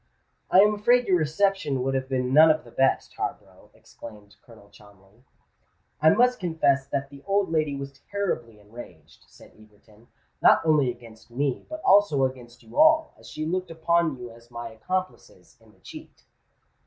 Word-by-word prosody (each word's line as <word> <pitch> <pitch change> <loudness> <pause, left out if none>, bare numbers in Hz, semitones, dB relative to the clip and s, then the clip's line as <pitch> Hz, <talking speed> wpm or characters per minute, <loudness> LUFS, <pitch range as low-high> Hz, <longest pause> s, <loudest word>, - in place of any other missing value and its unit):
"I 185 - +6
am 210 +1 +4
afraid 240 +4 +2
your 180 -2 +3
reception 155 -4 -1
would 135 +1 -1
have 130 0 -3
been 130 -1 -2
none 155 +2 +7
of 155 0 +1
the 120 - -16
best, 135 +2 0
Harborough," - - -7
exclaimed 105 -3 -14
Colonel 105 -4 -19
Cholmondeley. 100 +3 -21 0.8
"I 155 - +6
must 250 +7 +3
confess 145 -6 0
that 140 0 -4
the 140 -1 -13
old 195 -3 0
lady 155 -3 0
was 140 0 -9
terribly 120 - -4
enraged," 105 -6 -14
said - - -19
Egerton; 110 +1 -22 0.3
"not - - +4
only 150 -5 +3
against 120 -2 -12
me, 135 +2 -3
but 315 0 -8
also 190 -9 +4
against 125 -2 -8
you - - -7
all, 315 0 +4
as - - -16
she 155 - -5
looked 185 +2 -3
upon 165 -2 0
you 120 -1 -9
as 115 +1 -18
my 120 -1 -7
accomplices 185 +12 -6
in - - -22
the - - -28
cheat." - - -13
140 Hz, 170 wpm, -25 LUFS, 120-180 Hz, 0.8 s, none